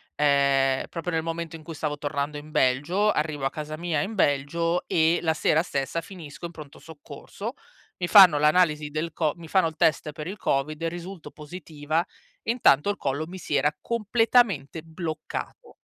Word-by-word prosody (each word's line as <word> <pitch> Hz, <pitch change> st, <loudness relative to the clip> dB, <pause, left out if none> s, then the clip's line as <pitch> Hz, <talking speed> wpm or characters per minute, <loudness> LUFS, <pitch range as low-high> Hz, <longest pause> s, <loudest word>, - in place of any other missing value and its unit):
ehm, 140 Hz, -2 st, +3 dB
proprio 175 Hz, +1 st, -4 dB
nel 160 Hz, 0 st, 0 dB
momento 165 Hz, 0 st, -4 dB
in 160 Hz, -, -11 dB
cui 165 Hz, +1 st, -8 dB
stavo 150 Hz, 0 st, -3 dB
tornando 145 Hz, 0 st, -3 dB
in 150 Hz, +1 st, -10 dB
Belgio, 150 Hz, +12 st, +2 dB
arrivo 150 Hz, -3 st, -2 dB
a -, -, +2 dB
casa 155 Hz, +1 st, -6 dB
mia 165 Hz, -3 st, -1 dB
in 220 Hz, +8 st, -4 dB
Belgio 165 Hz, +2 st, +1 dB
e 165 Hz, +1 st, +3 dB
la 160 Hz, -2 st, +1 dB
sera 155 Hz, 0 st, +2 dB
stessa 140 Hz, +1 st, -2 dB
finisco 170 Hz, -4 st, -10 dB
in 170 Hz, -, -6 dB
pronto 150 Hz, -4 st, -12 dB
soccorso. 160 Hz, -3 st, -9 dB, 0.4 s
Mi 175 Hz, -, -2 dB
fanno 180 Hz, -6 st, +8 dB
l'analisi 150 Hz, -1 st, +3 dB
del 155 Hz, +2 st, -3 dB
co 155 Hz, -2 st, 0 dB
mi 170 Hz, -1 st, -11 dB
fanno 185 Hz, 0 st, +3 dB
il 160 Hz, -, -7 dB
test 155 Hz, -1 st, +1 dB
per 150 Hz, +1 st, -7 dB
il 195 Hz, +3 st, -6 dB
COVID 150 Hz, -1 st, -1 dB
e 165 Hz, -, 0 dB
risulto 175 Hz, +1 st, -8 dB
positiva, 155 Hz, -1 st, -4 dB, 0.4 s
e -, -, -1 dB
intanto, 200 Hz, -, +4 dB
il 205 Hz, -, -1 dB
collo 140 Hz, +3 st, -2 dB
mi 185 Hz, +2 st, -8 dB
si 155 Hz, -4 st, -3 dB
era 145 Hz, +2 st, +2 dB
completamente 225 Hz, -, +1 dB
bloccato. 160 Hz, -1 st, -6 dB
160 Hz, 180 wpm, -25 LUFS, 145-175 Hz, 0.4 s, fanno